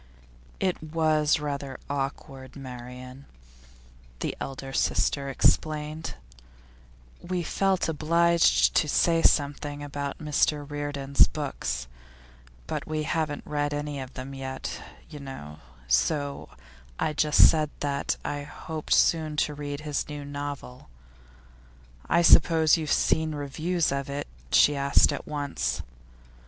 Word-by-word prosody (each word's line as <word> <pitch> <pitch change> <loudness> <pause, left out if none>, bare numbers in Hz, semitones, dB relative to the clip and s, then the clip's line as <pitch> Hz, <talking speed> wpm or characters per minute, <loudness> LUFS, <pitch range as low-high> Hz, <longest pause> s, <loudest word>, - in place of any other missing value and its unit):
'It 185 -4 0
was 155 -1 +2
rather 140 -2 -4
awkward, 135 -1 -5
Marian,' 125 0 -9 0.9
the - - -2
elder 135 0 -6
sister 140 +1 +1
explained. 155 +3 0 1.1
'We 180 0 -2
felt 190 +1 +1
obliged 170 +2 +3
to 155 - +3
say 165 +2 +3
something 145 0 +1
about 140 -1 -4
Mr 150 -1 0
Reardon's 145 -1 +2
books, 100 - -3 0.8
but - - -4
we 155 -1 -2
haven't 150 -1 -2
read 145 0 -1
any 145 -1 -4
of 130 0 -8
them 130 +1 -6
yet, 130 0 -5 0.3
you 150 - -10
know, 75 - -9 0.3
so 140 - 0 0.5
I 155 - 0
just 150 0 +6
said 155 -2 +1
that 140 -1 -1
I 145 0 -2
hoped 155 +2 -2
soon 155 -2 +2
to 150 - -6
read 145 0 -5
his 150 -1 -3
new 145 -1 -6
novel. 145 - -7 1.2
"I 170 +1 +4
suppose 160 -1 +6
you 160 -2 -2
have - - -2
seen 160 -1 +2
reviews 155 +4 -1
of 140 0 -2
it?" 140 +1 -3 0.3
she 145 - +5
asked 140 +1 +4
at 140 - -6
once. 140 - -2
145 Hz, 120 wpm, -27 LUFS, 140-155 Hz, 1.2 s, just